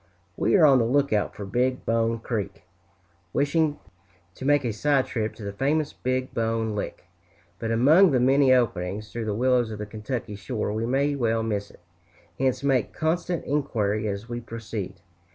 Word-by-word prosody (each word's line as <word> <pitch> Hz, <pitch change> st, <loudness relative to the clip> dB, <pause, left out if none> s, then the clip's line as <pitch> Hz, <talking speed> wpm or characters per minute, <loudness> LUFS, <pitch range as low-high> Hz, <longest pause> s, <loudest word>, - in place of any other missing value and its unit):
We -, -, +2 dB
are 175 Hz, -5 st, +7 dB
on 135 Hz, -3 st, +6 dB
the 115 Hz, -, +2 dB
lookout 125 Hz, -5 st, +1 dB
for 100 Hz, -, -6 dB
Big 125 Hz, +5 st, 0 dB
Bone 115 Hz, 0 st, +1 dB
Creek, 110 Hz, -4 st, -4 dB, 0.7 s
wishing 150 Hz, +1 st, +1 dB, 0.6 s
to 130 Hz, -, -8 dB
make 145 Hz, -1 st, +3 dB
a 115 Hz, -, -1 dB
side 140 Hz, +4 st, +2 dB
trip 110 Hz, -2 st, -3 dB
to 110 Hz, -, -10 dB
the 100 Hz, 0 st, -5 dB
famous 145 Hz, +6 st, 0 dB
Big 130 Hz, 0 st, -2 dB
Bone 115 Hz, -2 st, -1 dB
Lick, 105 Hz, -, -5 dB, 0.6 s
but 115 Hz, -, -3 dB
among 150 Hz, +12 st, +6 dB
the 130 Hz, -4 st, +2 dB
many 135 Hz, +2 st, +4 dB
openings 105 Hz, -4 st, 0 dB
through 115 Hz, -1 st, -4 dB
the 105 Hz, -1 st, -1 dB
willows 125 Hz, 0 st, +2 dB
of 110 Hz, -, -6 dB
the 105 Hz, -, -5 dB
Kentucky 105 Hz, +1 st, -5 dB
shore 105 Hz, +1 st, -3 dB
we 110 Hz, +2 st, -2 dB
may 140 Hz, +3 st, +1 dB
well 115 Hz, -4 st, 0 dB
miss 105 Hz, -2 st, -2 dB
it, -, -, -19 dB, 0.6 s
hence 130 Hz, 0 st, 0 dB
make 135 Hz, -5 st, +1 dB
constant 170 Hz, +2 st, -1 dB
inquiry 110 Hz, -7 st, 0 dB
as 100 Hz, +2 st, -4 dB
we 120 Hz, 0 st, -5 dB
proceed. 110 Hz, -5 st, -6 dB
120 Hz, 175 wpm, -25 LUFS, 110-135 Hz, 0.7 s, are